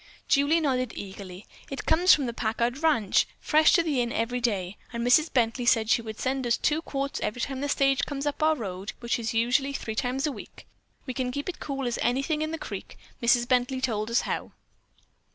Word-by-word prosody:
Julie 285 Hz, +4 st, +3 dB
nodded 255 Hz, -6 st, 0 dB
eagerly. 190 Hz, -1 st, -8 dB, 0.2 s
"It 275 Hz, -, -5 dB
comes 355 Hz, +3 st, +5 dB
from 285 Hz, -, +5 dB
the 235 Hz, -, -3 dB
Packard 235 Hz, +4 st, -1 dB
ranch, 290 Hz, -12 st, +3 dB
fresh 310 Hz, +1 st, +4 dB
to 340 Hz, -, +4 dB
the 290 Hz, -6 st, 0 dB
inn 240 Hz, -1 st, -1 dB
every 245 Hz, +2 st, -1 dB
day, 200 Hz, -5 st, -1 dB
and 235 Hz, 0 st, -3 dB
Mrs. 305 Hz, +6 st, +4 dB
Bently 245 Hz, 0 st, +1 dB
said 225 Hz, -2 st, +3 dB
she -, -, +4 dB
would 220 Hz, -1 st, -8 dB
send 260 Hz, -1 st, -1 dB
us 235 Hz, -, +2 dB
two 305 Hz, +2 st, +1 dB
quarts 275 Hz, -3 st, -3 dB
every 235 Hz, +3 st, -3 dB
time 270 Hz, 0 st, -3 dB
the 285 Hz, -, -2 dB
stage 275 Hz, -1 st, +2 dB
comes 280 Hz, -1 st, -4 dB
up 290 Hz, 0 st, -2 dB
our 310 Hz, 0 st, +4 dB
road, 195 Hz, -5 st, -5 dB
which 235 Hz, 0 st, -1 dB
usually 245 Hz, +4 st, +2 dB
is 280 Hz, -, -3 dB
three 220 Hz, -, -5 dB
times 255 Hz, +5 st, -1 dB
a 300 Hz, -, 0 dB
week. -, -, -11 dB, 0.4 s
We 260 Hz, -, -4 dB
can 250 Hz, -1 st, -2 dB
keep 285 Hz, +3 st, -4 dB
it 365 Hz, -, -5 dB
cool 275 Hz, -2 st, -4 dB
as 240 Hz, -1 st, -2 dB
anything 275 Hz, +5 st, 0 dB
in 310 Hz, -, -1 dB
the 325 Hz, -, -3 dB
creek. -, -, -8 dB, 0.2 s
Mrs. 240 Hz, 0 st, +3 dB
Bently 255 Hz, +1 st, +1 dB
told 220 Hz, -4 st, -1 dB
us 235 Hz, -, +2 dB
how." -, -, -4 dB
255 Hz, 215 wpm, -27 LUFS, 235-280 Hz, 0.4 s, comes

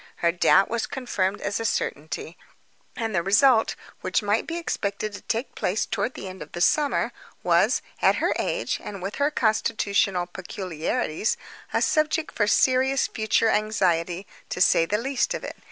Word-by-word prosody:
Her 170 Hz, -, +2 dB
doubt 180 Hz, +2 st, +4 dB
was 230 Hz, 0 st, -2 dB
confirmed 205 Hz, -7 st, -2 dB
as 200 Hz, +2 st, -2 dB
a -, -, -2 dB
certainty; 160 Hz, -5 st, -3 dB, 0.6 s
and 225 Hz, -3 st, -3 dB
the 170 Hz, -, +2 dB
result, 220 Hz, +5 st, +4 dB, 0.2 s
which -, -, 0 dB
might 205 Hz, +2 st, +1 dB
be 330 Hz, -, -3 dB
expected 210 Hz, -10 st, -3 dB
to 200 Hz, -, -8 dB
take 230 Hz, +4 st, -3 dB
place 195 Hz, +4 st, -1 dB
toward 255 Hz, -, -2 dB
the -, -, -7 dB
end 185 Hz, 0 st, -9 dB
of 150 Hz, -, -9 dB
the 175 Hz, -, -5 dB
summer, 290 Hz, -, +2 dB, 0.3 s
was, -, -, +3 dB, 0.2 s
at -, -, +5 dB
her -, -, +1 dB
age -, -, -1 dB
and 195 Hz, -3 st, -7 dB
with 195 Hz, +2 st, -4 dB
her 285 Hz, +1 st, +2 dB
constitutional 215 Hz, -7 st, +1 dB
peculiarities, 180 Hz, +1 st, -2 dB, 0.3 s
a -, -, +1 dB
subject 310 Hz, +1 st, +1 dB
for 210 Hz, -, +1 dB
serious 265 Hz, +4 st, +3 dB
future 220 Hz, +1 st, +1 dB
anxiety, 185 Hz, -4 st, +1 dB, 0.2 s
to -, -, -4 dB
say 165 Hz, -2 st, +4 dB
the 210 Hz, -, +1 dB
least 260 Hz, +3 st, 0 dB
of -, -, -6 dB
it. -, -, -6 dB
210 Hz, 170 wpm, -25 LUFS, 185-245 Hz, 0.6 s, at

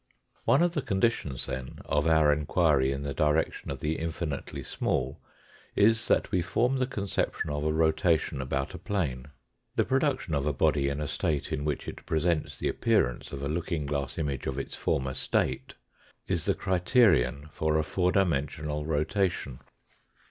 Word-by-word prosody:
One 145 Hz, -, +5 dB
of 175 Hz, -1 st, +2 dB
the 150 Hz, -, 0 dB
conditions, 95 Hz, -, 0 dB
then, 65 Hz, 0 st, -5 dB
of 75 Hz, +2 st, +1 dB
our 80 Hz, -2 st, +5 dB
inquiry 75 Hz, -2 st, +2 dB
in 70 Hz, 0 st, -3 dB
the 70 Hz, -1 st, -3 dB
direction 75 Hz, +3 st, 0 dB
of -, -, -5 dB
the 75 Hz, +1 st, -1 dB
infinitely 80 Hz, -3 st, -4 dB
small -, -, -2 dB, 0.6 s
is 110 Hz, +2 st, +4 dB
that -, -, +2 dB
we 90 Hz, -, +2 dB
form 125 Hz, +9 st, +1 dB
the 130 Hz, -, +1 dB
con 105 Hz, -6 st, -4 dB
ception 100 Hz, -, -1 dB
of 75 Hz, -, -2 dB
a 75 Hz, -, +1 dB
rotation 80 Hz, -2 st, +2 dB
about 70 Hz, +1 st, -2 dB
a -, -, -7 dB
plane. 70 Hz, -11 st, -2 dB, 0.5 s
The -, -, +2 dB
production 135 Hz, -, 0 dB
of 70 Hz, 0 st, 0 dB
a 75 Hz, -, +1 dB
body 70 Hz, +1 st, +2 dB
in 70 Hz, +1 st, -3 dB
a 75 Hz, -, -2 dB
state 75 Hz, 0 st, -1 dB
in 70 Hz, -, -2 dB
which 75 Hz, -, -2 dB
it -, -, -7 dB
presents 80 Hz, 0 st, 0 dB
the -, -, -2 dB
appearance 60 Hz, -, +1 dB
of 70 Hz, 0 st, -5 dB
a -, -, -1 dB
looking 80 Hz, 0 st, -2 dB
glass 70 Hz, -1 st, -3 dB
image 75 Hz, -5 st, -2 dB
of 65 Hz, -, -2 dB
its 70 Hz, -, -4 dB
former 65 Hz, -1 st, -1 dB
state 65 Hz, -, -1 dB, 0.5 s
is -, -, -1 dB
the -, -, +2 dB
criterion 85 Hz, -, +3 dB
for 80 Hz, 0 st, 0 dB
a 80 Hz, -, +2 dB
four 90 Hz, +3 st, +1 dB
dimensional 75 Hz, -4 st, 0 dB
rotation. 80 Hz, +5 st, 0 dB
75 Hz, 175 wpm, -28 LUFS, 70-90 Hz, 0.6 s, One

